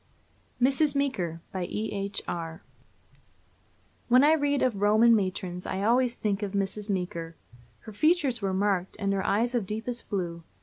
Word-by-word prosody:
MRS. 275 +3 +3
MEEKER. 185 - -1
BY 185 -2 -3
E.H. 200 0 -3
ARR. 165 +1 -5 1.4
When 250 +2 +6
I 305 +2 +6
read 285 -2 +1
of 230 -6 0
Roman 220 +3 +5
matrons 185 -3 -2
I 190 - -2
always 245 +2 +2
think 205 -3 -1
of 205 -1 -3
Mrs. 200 +1 -2
Meeker. 170 -4 -3 0.5
Her 220 - -10
features 280 - +2
were 195 -1 0
marked, 190 -1 0
and 200 0 0
her 195 -1 -1
eyes 230 +5 +1
of 230 -6 -1
deepest 225 +3 -5
blue. 175 -4 -3
205 Hz, 155 wpm, -27 LUFS, 190-245 Hz, 1.4 s, When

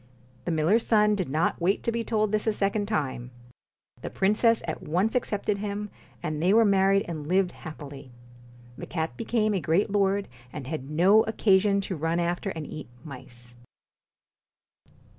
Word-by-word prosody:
The - - -1
miller's 165 +9 +2
son 210 -1 +4
did 185 -8 -2
not 155 +4 0
wait 190 +4 +1
to 235 - 0
be 230 0 -2
told 215 -2 0
this 215 +1 -1
a 220 - +3
second 205 0 0
time. 135 - -2 0.7
The - - -5
princess 220 +4 +2
at 160 - -4
once 185 +8 0
accepted 210 -4 -1
him, 210 0 -4 0.3
and 155 -2 -3
they 185 +5 +3
were 230 0 +6
married 195 0 +3
and 155 -4 -5
lived 185 +1 +2
happily. 145 -4 -10 0.7
The - - -7
cat 160 -1 -3
became 220 -2 0
a 190 - -1
great 185 +7 +1
lord, 200 0 +1 0.2
and 145 -1 -7
had 140 -1 -5
no 185 +8 +5
occa 200 -3 +3
sion 200 -1 +1
to 190 -1 -4
run 165 +2 -1
after 175 +3 -1
and 160 -5 -5
eat 155 - -8 0.2
mice. 120 -4 -10
190 Hz, 170 wpm, -26 LUFS, 160-210 Hz, 0.7 s, were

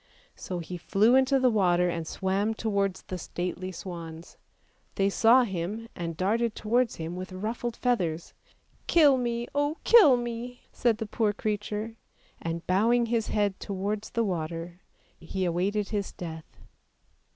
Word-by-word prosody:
So 180 - -5
he 175 +1 -6
flew 200 +7 +3
into 265 +1 +4
the 255 -1 +4
water 180 -4 +3
and 170 -2 -3
swam 195 +5 -1
towards 200 -4 -1
the 185 - -6
stately 180 +2 -4
swans; 170 -2 -8 0.6
they 195 0 +2
saw 235 +5 +5
him 200 +2 -4
and 170 -2 -4
darted 220 +5 +1
towards 235 +2 +1
him 165 +1 -5
with 185 +1 -6
ruffled 225 +5 -3
feathers. 175 -10 -1 0.3
" - - -37
Kill 300 -5 +6
me, 240 -1 -2
oh, 290 +2 0
kill 330 - +7
me! 240 +1 -5
" - - -37
said 235 -3 +2
the 220 - -3
poor 210 0 0
creature, 215 +1 -3 0.4
and 165 0 -4
bowing 230 +6 +3
his 230 -1 0
head 205 -2 0
towards 205 +2 -3
the 230 - 0
water 170 -1 -4 0.4
he 185 +3 -3
awaited 195 +4 0
his 205 -2 -2
death. 160 -2 -9
205 Hz, 150 wpm, -28 LUFS, 180-235 Hz, 0.6 s, kill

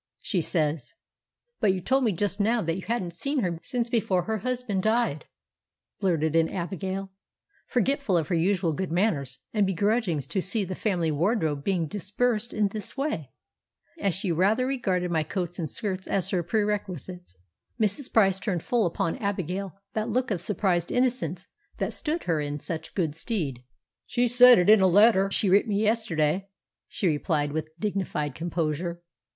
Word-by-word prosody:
She 185 -5 0
says——" 155 -5 -1 0.6
"But 195 - +3
you - - -3
told 260 +8 +1
me 220 - +3
just 200 +2 -1
now 225 +2 +2
that 165 0 -1
you 190 - -5
hadn't 195 -7 -2
seen 275 - -1
her 175 -5 -2
since 235 +6 -2
before 200 -6 +1
her 220 +3 -2
husband 245 -4 -2
died," 220 -7 +1 0.7
blurted 165 -5 +1
in 165 0 +4
Abigail, 190 +2 -4 0.6
forgetful 255 -5 +1
of 160 - 0
her - - 0
usual 170 0 +1
good 185 +2 -3
manners, 155 - 0 0.2
and 210 -2 +3
begrudging 200 -2 +1
to 190 +8 -2
see 200 +2 0
the 185 - -4
family 175 -5 0
wardrobe 155 -3 0
being 180 -2 0
disbursed 210 +6 -1
in 210 -2 +1
this 210 +5 -5
way, 270 - -2 0.7
as 195 - 0
she 190 -1 -1
rather 200 +9 +2
regarded 190 -10 -1
my 160 -2 +2
coats 175 +2 -4
and 160 -3 -2
skirts 195 -4 -4
as 195 -1 0
her 185 -3 +1
perquisites. 185 - -3 0.4
Mrs. 215 +5 0
Price 195 -4 +4
turned 185 -6 -2
full 235 -6 +2
upon 165 +2 -2
Abigail 195 - -3 0.2
that 220 +1 -1
look 250 +2 0
of 180 -5 -1
surprised 180 -3 0
innocence 235 - 0 0.3
that - - -2
stood 325 +2 -2
her 165 -4 0
in 145 0 -3
such 160 +1 -6
good 165 -6 0
stead. 160 - -3 0.5
"She 245 0 +1
said 245 +1 +8
it 180 - +3
in 215 -1 +7
a 190 - +6
letter 195 +1 +5
she 195 - +1
writ 200 +5 +4
me 205 -2 0
yesterday," 195 -5 +1 0.4
she - - -3
replied 150 -2 +1
with 155 +2 -5
dignified 185 -8 -2
composure. 170 +2 -2
190 Hz, 170 wpm, -26 LUFS, 165-215 Hz, 0.7 s, said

